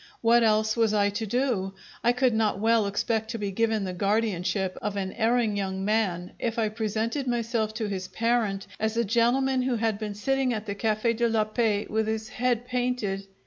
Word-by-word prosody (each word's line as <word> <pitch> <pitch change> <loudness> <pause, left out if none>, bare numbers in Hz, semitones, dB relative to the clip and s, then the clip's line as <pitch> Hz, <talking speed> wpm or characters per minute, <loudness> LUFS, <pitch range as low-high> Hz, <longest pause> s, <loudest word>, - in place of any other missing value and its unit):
What 235 +1 +5
else 215 -1 +3
was 225 -2 +2
I 205 -1 +3
to 215 +2 -3
do? 210 -5 0 0.3
I 240 - +5
could 250 0 +2
not 220 -3 +1
well 225 -1 +3
expect 220 +2 -1
to 230 - -3
be 205 -2 -3
given 220 +1 +1
the 185 -1 -3
guardianship 195 -2 0
of 210 -1 -2
an 190 -1 -3
erring 230 -2 +1
young 190 -1 -2
man 195 -5 0
if 230 -1 -2
I 220 -2 +1
presented 225 +5 -2
myself 230 -2 0
to 220 -2 -2
his 190 -2 -4
parent 225 -3 0
as 220 +1 -1
a 235 - +2
gentleman 255 +4 +2
who 250 -1 0
had 220 -2 0
been 210 -2 -4
sitting 265 +4 0
at 215 -1 -4
the 200 - -3
Cafe' 215 +2 0
de 235 +1 +1
la 220 -1 +2
Paix 215 -1 0
with 220 0 0
his 220 0 -2
head 245 -1 0
painted. 245 -6 -2
220 Hz, 200 wpm, -27 LUFS, 205-235 Hz, 0.3 s, What